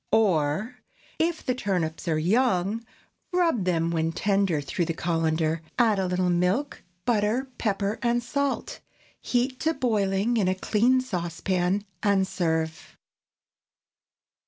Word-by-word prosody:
Or, 205 +2 +2 0.4
If 330 0 0
the 255 - +1
turnips 180 -9 -2
are 160 -2 +2
young, 205 +3 +1 0.5
rub 335 - +2
them 170 -2 +1
when 165 0 0
tender 195 -3 +1
through 145 +5 -2
the 165 - -3
cullender; 165 -1 0 0.2
add 225 -5 +3
a 190 - 0
little 180 0 +1
milk, 180 +11 0 0.2
butter, 230 +3 +1
pepper, 200 -1 -1
and 240 0 +1
salt; 280 +3 -2 0.4
heat 255 +1 0
to 320 0 0
boiling 210 -1 +1
in 200 -4 +2
a 185 - +2
clean 235 +7 +2
saucepan 180 -1 -1 0.2
and 200 -2 +3
serve. 160 -3 -2
195 Hz, 125 wpm, -26 LUFS, 170-240 Hz, 0.5 s, add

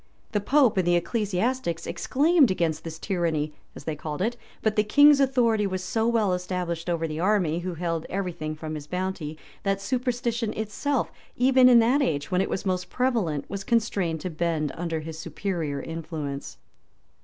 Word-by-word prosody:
[*] - - -36
The 205 - 0
pope 255 -2 +3
and 185 -2 +2
the 175 - +4
ecclesiastics 195 0 -1
exclaimed 280 - +3
against 165 -4 0
this 160 -1 -6
tyranny, 165 -5 -1 0.2
as - - -9
they 155 +1 -3
called 150 0 -5
it; 235 +3 0 0.3
but 220 -1 +2
the 210 - +4
king's 290 +6 +6
authority 240 -6 +3
was 185 -1 -3
so 220 +5 0
well 220 -5 +2
established 180 -2 -3
over 165 -1 0
the 155 0 -4
army, 180 -4 +2
who 175 0 -4
held 165 -1 -2
every 190 -2 -2
thing 155 -2 -5
from 155 0 -6
his 150 -1 -6
bounty, 180 -4 -3 0.2
that 195 -1 0
superstition 240 -1 -1
itself, 225 +6 -1 0.2
even 255 0 +6
in 245 - +8
that 250 +6 +3
age, 150 - -1
when 180 0 +3
it - - -1
was 190 - -3
most 180 -2 -1
prevalent, 225 - 0
was 195 -1 -5
constrained 195 -9 0
to 180 - -4
bend 155 -2 -1
under 165 -2 -3
his 160 0 -7
superior 165 -5 -3
influence. 155 -3 -5
185 Hz, 180 wpm, -26 LUFS, 165-225 Hz, 0.3 s, in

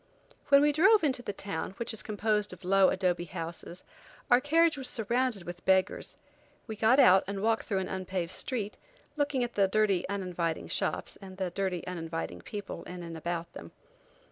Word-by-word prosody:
When 280 0 +6
we 295 - +4
drove 385 +7 +5
into 265 -5 +1
the 245 - -4
town, 195 -2 -5
which 235 -1 -3
is 220 - -3
composed 210 0 0
of 180 - -13
low 195 0 +5
adobe 180 -2 0
houses, 170 +2 -7 0.5
our 245 +1 +7
carriage 325 +3 +3
was 265 -3 -2
surrounded 235 -2 0
with 175 0 -8
beggars. 190 -1 +1 0.5
We 220 - -6
got 225 +5 +4
out 190 -6 +7
and 200 0 -4
walked 225 0 +1
through 195 -3 0
an 185 - -4
unpaved 185 -2 -3
street, 215 -3 -3 0.4
looking 290 -4 0
at 240 - -4
the 200 -1 +3
dirty, 195 -3 +1
uninviting 180 -4 -2
shops - - -2
and 190 -1 -10
the 190 -2 -2
dirty, 185 -2 -2
uninviting 165 -2 -5
people 205 -2 -7
in 180 -1 -7
and 165 -1 -7
about 170 +1 -4
them. - - -10
195 Hz, 180 wpm, -30 LUFS, 180-235 Hz, 0.5 s, our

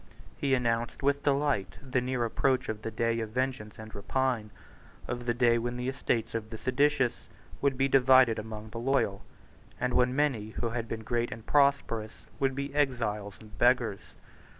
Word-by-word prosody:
He 135 -2 +1
announced 120 0 -1
with 140 0 +2
delight 140 - +1
the 130 -1 -1
near 125 -1 -1
approach 130 +3 +1
of 110 -1 -3
the 115 - -3
day 115 +1 0
of 110 -1 -3
vengeance 125 -3 -3
and 110 0 -10
rapine, 120 +1 -1 0.6
of 120 0 -4
the 120 - +3
day 120 -1 +4
when 120 +1 -3
the 125 +1 -3
estates 120 -4 -1
of 110 -1 -3
the 110 - -6
seditious 130 0 +1 0.3
would 140 -2 +1
be 135 +1 +3
divided 130 -3 +5
among 110 0 -7
the 115 - -5
loyal, 115 -6 0 0.6
and 125 0 0
when 125 +1 +3
many 135 -8 +1
who 115 - 0
had 115 0 -3
been 110 -1 -5
great 120 +1 -1
and 115 0 -8
prosperous 140 -6 +2 0.3
would 135 -1 +1
be 140 0 -4
exiles 115 -8 -1
and 110 -1 -14
beggars. 120 -4 +3
120 Hz, 175 wpm, -29 LUFS, 110-135 Hz, 0.6 s, divided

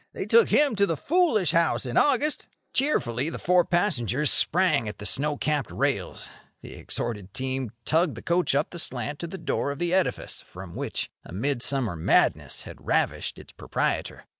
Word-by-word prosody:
They - - -4
took 465 -1 +5
him 285 -5 +4
to 200 0 +4
the 165 - -1
foolish 260 - +2
house 170 -4 +2
in 125 0 -4
August." 290 +1 +2 0.3
Cheerfully 140 - +1
the - - -5
four 180 0 +3
passengers 150 - +1
sprang 175 - +2
at 105 - -8
the 105 - -8
snow 145 +6 0
capped 150 -3 -1
rails. - - -2 0.3
The - - -9
exhorted 105 -5 -4
team 130 -1 -2 0.2
tugged 160 -2 +2
the 115 - -9
coach 175 -4 +1
up 145 +3 +1
the 175 - -6
slant 125 0 -3
to 170 - -4
the 190 - -7
door 140 - -1
of 140 - -4
the 175 +2 -1
edifice 190 -1 0
from 90 -1 -11
which - - -3
a - - -12
mid 120 +7 -1
summer 125 -10 0
madness 80 - +1
had - - -11
ravished - - 0
its - - -13
proprietor. - - -2
150 Hz, 185 wpm, -26 LUFS, 120-180 Hz, 0.3 s, took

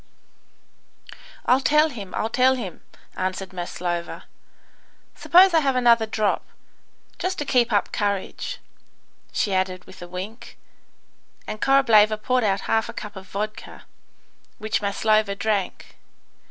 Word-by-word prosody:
"I'll 250 +2 +4
tell 300 +3 +4
him 205 -9 -8
I'll 220 - -1
tell 260 +1 +4
him," 195 -9 -7 0.3
answered 185 0 -3
Maslova. 175 -1 -4 0.9
"Suppose 370 +1 +5
I 325 - +6
have 275 -4 +1
another 235 -3 +4
drop, 215 -1 0 0.8
just 370 +1 -2
to 295 - -3
keep 245 -3 +2
up 205 -2 +1
courage," 205 - -2 0.7
she 200 - -1
added, 185 -1 -1
with - - -14
a 175 - -8
wink; 190 +6 -8 0.9
and 215 0 -6
Korableva 220 -6 +5
poured 250 +3 0
out 200 -2 +1
half 225 +1 0
a - - -6
cup 210 -1 -8
of 190 -1 -10
vodka, 215 +3 -6 0.7
which 215 -2 -2
Maslova 215 0 +1
drank. 205 -2 -2
215 Hz, 125 wpm, -23 LUFS, 195-250 Hz, 0.9 s, I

